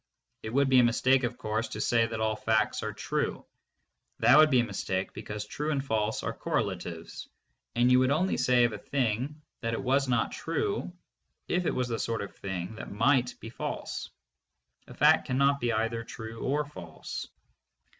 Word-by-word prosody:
It 110 - -5
would 140 +3 +3
be 130 -1 +6
a - - +6
mistake, 130 +3 +3
of 120 0 -2
course, 110 -1 -2
to - - -7
say 115 -1 +3
that 110 0 -5
all 110 0 +1
facts 110 0 +1
are - - -3
true. - - -2 0.7
That 120 - +6
would 155 0 +7
be 130 -4 +5
a - - 0
mistake 95 -3 -3
because 105 0 -6
true 150 +8 -3
and 140 -3 -1
false 110 -3 -1
are - - -2
correlatives, - - -3 0.5
and 120 +1 +4
you 125 - +6
would 130 0 +3
only 160 +7 +2
say 125 -1 +4
of 120 -2 +2
a 105 - -6
thing 130 +3 -1 0.2
that 115 -1 -2
it - - -4
was 135 +1 +2 0.2
true 400 - -2 0.6
if 180 -1 0
it - - 0
was 125 -1 0
the 115 -2 -2
sort 115 -2 -1
of 100 - -9
thing 95 0 -5
that - - -7
might 125 +3 +2
be 115 - -8
false. - - -5 0.8
A - - -11
fact - - +5
cannot 140 +2 +3
be 120 -2 0
either 115 +1 -1
true 115 -1 -8
or 145 +2 0
false. 85 - -7
120 Hz, 185 wpm, -29 LUFS, 110-135 Hz, 0.8 s, would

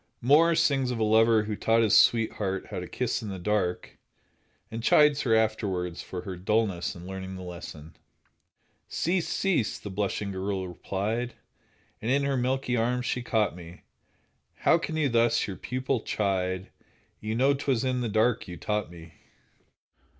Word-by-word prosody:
Moore 160 +7 +5
sings 140 -5 +2
of 125 - -2
a 110 - 0
lover 110 0 +4
who 105 0 -3
taught 115 +2 +2
his 110 - +4
sweetheart 105 -4 +3
how - - -3
to - - -6
kiss - - -2
in 110 - -6
the 95 - -5
dark, 90 -1 -2 0.7
and 115 +1 -4
chides 150 +4 +5
her 115 -3 +2
afterwards 95 -6 -1
for 90 - -6
her 95 -2 -5
dullness 95 -1 0
in 85 0 -10
learning 95 0 -6
the 95 - -8
lesson. 85 -3 -9 0.9
"Cease, 175 0 -1
cease," 180 - 0
the 105 - -8
blushing 100 +1 -2
girl 95 0 -3
replied, 105 +7 -3 0.7
And 110 - -3
in 140 +2 +2
her 140 -1 0
milky 130 0 0
arms 120 +2 0
she 125 - -1
caught 110 -6 0
me; 85 0 -12 0.8
"How 170 - +4
can 160 -1 -4
you 155 -2 +2
thus 120 -2 +2
your 100 - -5
pupil 130 +3 -2
chide? 95 -3 -1 0.5
You 110 +1 -3
know 135 +4 +4
'twas 135 -3 0
in 130 -1 0
the 120 - -1
dark 110 +1 +1
you 90 -1 -7
taught 105 +3 -2
me!" 85 -1 -13
110 Hz, 165 wpm, -27 LUFS, 95-125 Hz, 0.9 s, Moore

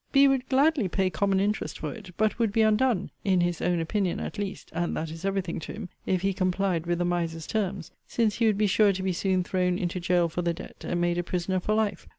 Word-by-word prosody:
B 275 0 +6
would 265 -1 +1
gladly 275 -3 +3
pay 185 +1 0
common 195 -1 +1
interest 205 +2 -1
for - - -4
it; 210 -5 -11
but 215 +2 +1
would 225 -3 +2
be 220 +2 +3
undone, 215 -2 +2
(in 190 -3 +3
his 175 -1 0
own 175 -1 +1
opinion 180 +2 -1
at 215 - -5
least, 200 -1 -5
and 170 +1 -1
that 160 0 -3
is 165 +2 -9
every 195 0 +1
thing 170 -2 -4
to 160 - -7
him,) 205 -4 -7 0.2
if 185 -1 +1
he 195 0 +2
complied 185 -2 0
with 175 0 +1
the 175 - 0
miser's 170 -2 -1
terms; 195 -5 -2 0.2
since 225 -3 +1
he 230 -1 +3
would 210 -2 +2
be 210 - +3
sure 205 0 +4
to 190 0 -4
be 190 -1 0
soon 185 +1 +1
thrown 180 0 0
into 180 0 -2
gaol 175 -1 +2
for 165 +2 -3
the 170 -1 0
debt, - - -11
and 175 - -1
made 175 0 +1
a - - 0
prisoner 180 +1 -1
for 210 +4 0
life. 210 -4 -1
190 Hz, 255 wpm, -27 LUFS, 175-210 Hz, 0.2 s, B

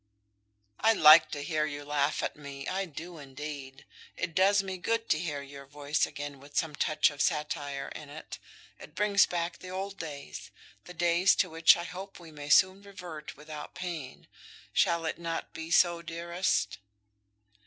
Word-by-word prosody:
"I 225 - +5
like 155 -4 +8
to 145 - -5
hear 155 -1 0
you 145 -1 -6
laugh 145 0 0
at - - -2
me, 140 -2 -8
I 195 +1 -1
do, 165 +1 -9
indeed. 140 -1 -8 0.3
It 170 -3 -3
does 195 +3 +4
me 190 -1 -5
good 230 +5 -1
to 155 - +3
hear 150 -4 -3
your 140 0 -11
voice 145 +1 0
again 145 -1 -7
with 145 +1 -10
some 160 -2 +1
touch 155 +1 +2
of 145 -1 -5
satire 145 -3 -1
in 150 - -9
it. 155 +2 -9 0.4
It - - -13
brings 205 -1 +4
back 170 0 -3
the 185 - -9
old 195 +2 -5
days, 145 - -7 0.4
the 180 - -11
days 175 +3 +4
to 185 - +1
which 165 0 +6
I 170 - -4
hope 185 +3 -8
we 170 -2 -12
may 145 -1 -8
soon 185 +5 +5
revert 180 -8 -9
without 150 0 -9
pain. 165 -8 -6 0.5
Shall 170 -1 +2
it 160 - -3
not 165 -1 -4
be 160 0 -7
so, 170 0 +4
dearest?" 170 - -1
160 Hz, 175 wpm, -30 LUFS, 145-180 Hz, 0.5 s, like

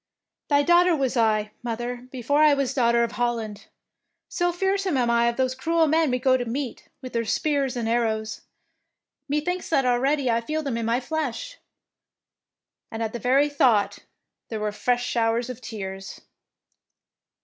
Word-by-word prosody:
" - - -64
" - - -65
Thy 285 -1 +4
daughter 345 +1 +5
was 270 -3 -1
I, 215 -2 +2
mother, 240 +1 -4
be 255 -2 -7
fore 285 +5 +2
I 300 -2 +6
was 275 -2 -1
Daughter 235 -2 +3
of 235 - -1
Holland. 230 -4 -3 0.6
So 350 -1 0
fearsome 385 -2 0
am 240 -2 +2
I 235 0 +3
of 235 - -1
those 260 -1 +1
cruel 330 +5 +1
men 315 0 +2
we 250 - +1
go 260 +1 +3
to 245 - -3
meet, 250 +2 -4 0.2
with 255 - -7
their 230 -1 0
spears 275 +3 0
and 230 -2 -2
80 230 - +1
THE 240 - +3
PKINCESS 235 - +1
WINS - - +2
arrows. 220 0 -7 0.9
Methinks 305 +5 -1
that 275 -5 +2
already 255 +2 +2
I 230 0 +1
feel 310 +6 -3
them 270 -5 -2
in 230 -1 -2
my 235 +2 +2
flesh"; 315 - -4 1.3
and 225 0 -4
at 220 - -3
the 240 - -4
very 265 +5 +3
thought 250 -8 +2 0.5
there 220 - -4
were 210 0 -1
fresh 245 +4 0
showers 235 +1 0
of 250 0 -10
tears. 195 -4 -7
250 Hz, 190 wpm, -24 LUFS, 230-290 Hz, 1.3 s, I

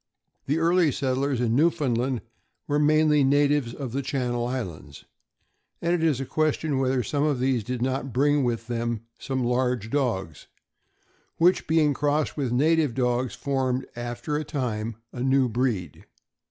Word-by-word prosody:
The 145 +3 +1
early 165 -1 +3
settlers 135 0 -1
in 120 -1 +1
Newfoundland 130 -5 +1 0.4
were 145 0 +1
mainly 150 -1 +4
natives 145 -2 +2
of 130 -1 -6
the 135 +3 -1
Channel 125 -3 -2
Islands; 90 - -6 0.7
and 170 +1 0
it 175 - +1
is 155 -6 +2
a 135 - -3
question 155 -1 0
whether 130 -1 +1
some 140 +7 -1
of 150 -4 +1
these 130 -3 +1
did 125 +2 -3
not 130 +1 -2
bring 145 +3 +2
with 115 -2 -1
them 115 -1 -2 0.2
some 130 -1 -2
large 125 -2 0
dogs, 100 - -2 0.9
which, 175 +3 +3
being 155 -2 +3
crossed 145 +1 0
with 140 -4 -1
the 120 - -1
native 155 -1 +2
dogs, 125 -1 0
formed, 130 -2 -1
after 120 +5 -3
a 155 - -2
time, 115 -7 -3 0.2
a 120 - -5
new 135 0 +3
breed. 115 - -2
130 Hz, 155 wpm, -25 LUFS, 120-145 Hz, 0.9 s, mainly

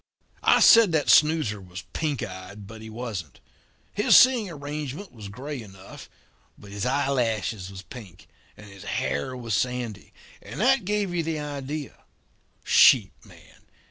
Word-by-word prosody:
"I - - +4
said 225 -7 +7
that 150 -2 +2
snoozer 150 -10 +3
was 90 +1 -10
pink 150 -5 -2
eyed, 95 +2 -9
but 110 +2 -11
he 110 - -9
wasn't. 110 - -7 0.5
His 210 - +5
seeing 250 -6 +5
arrangement 150 +3 -6
was 110 -4 -10
grey 130 +6 -7
enough, 95 -3 -13 0.5
but 100 - -14
his 105 +4 -3
eye 135 +2 0
lashes 110 -6 -1
was 95 -1 -10
pink 100 -1 -13 0.3
and 105 - -13
his 100 -3 -13
hair 70 - -3
was 115 -3 -5
sandy, 125 -2 -3 0.3
and - - -9
that 255 -1 +3
gave 205 -2 -1
you 175 - 0
the 160 -1 -3
idea. 145 0 -6 0.6
Sheep - - +5
man? - - -19
125 Hz, 150 wpm, -25 LUFS, 100-150 Hz, 0.6 s, said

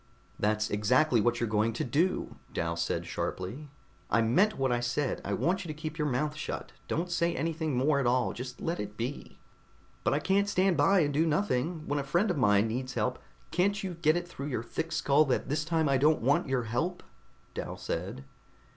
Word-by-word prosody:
"That's 110 +1 +1
exactly 120 +4 +3
what 120 +1 +1
you're 120 - 0
going 110 +1 +1
to - - -2
do," 160 +9 0 0.2
Dal 85 0 -1
said 85 0 -1
sharply. 125 +12 -4 0.4
"I 115 - +3
meant 185 - +3
what 135 -1 +1
I 120 - +2
said. 120 +3 -1
I - - -2
want 190 +4 0
you - - -8
to 155 - -5
keep 155 +1 -5
your 150 - +1
mouth 150 +4 -1
shut. 155 - -5 0.2
Don't 175 +3 -2
say 170 0 +1
anything 160 -1 -1
more 140 +3 +3
at 130 - +1
all, 125 0 +2
just 125 0 -7
let 165 +1 -2
it 105 0 -5
be." 125 +5 -5 0.7
"But - - +2
I - - +2
can't 200 +5 +2
stand 190 -2 +3
by 175 +6 +4
and 145 -2 +1
do 160 +3 +2
nothing! 160 -1 0
When 145 0 0
a - - -2
friend 175 +9 +1
of 175 - -2
mine 105 -3 +4
needs 125 +3 -3
help - - 0 0.2
" - - -31
"Can't 200 +2 +1
you 185 -2 -3
get 165 -1 +2
it 175 0 -4
through 140 -5 -6
your 125 -5 -2
thick 160 +8 -4
skull 145 +2 +4
that 130 0 -1
this 150 +2 0
time 160 -1 +1
I 135 -1 +3
don't 150 -2 +3
want 135 +2 +2
your 130 -2 +1
help?" 130 +11 -2 0.5
Dal - - -5
said. 100 +11 -4
145 Hz, 215 wpm, -30 LUFS, 120-165 Hz, 0.7 s, by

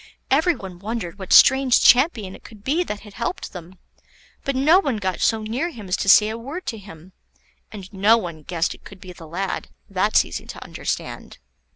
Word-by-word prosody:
Every 320 +5 +3
one 185 -3 -10
wondered 200 -3 -5
what 190 - -8
strange 265 -2 +6
champion 245 - +4
it - - -16
could 215 -3 -14
be 310 +9 +1
that 210 -7 -5
had 210 -1 -14
helped 360 - -4
them, 180 0 -10 0.7
but 275 - -2
no 305 +8 +5
one 275 - -1
got 190 -3 -3
so 225 -1 +1
near 245 +10 -2
him 220 - -10
as 180 - 0
to 195 - -1
say 210 +2 +7
a 225 +1 -5
word 290 +10 -7
to 225 - -5
him; 185 -2 -14 0.6
and 200 -2 -10
no 205 +4 +4
one 170 -7 -6
guessed 165 +2 -2
it - - -18
could 195 - -13
be 185 -1 -11
the 165 -2 -13
lad; 185 +4 -4 0.2
that's 195 +2 +2
easy - - -7
to - - -9
understand. - - -5
210 Hz, 205 wpm, -22 LUFS, 185-255 Hz, 0.7 s, say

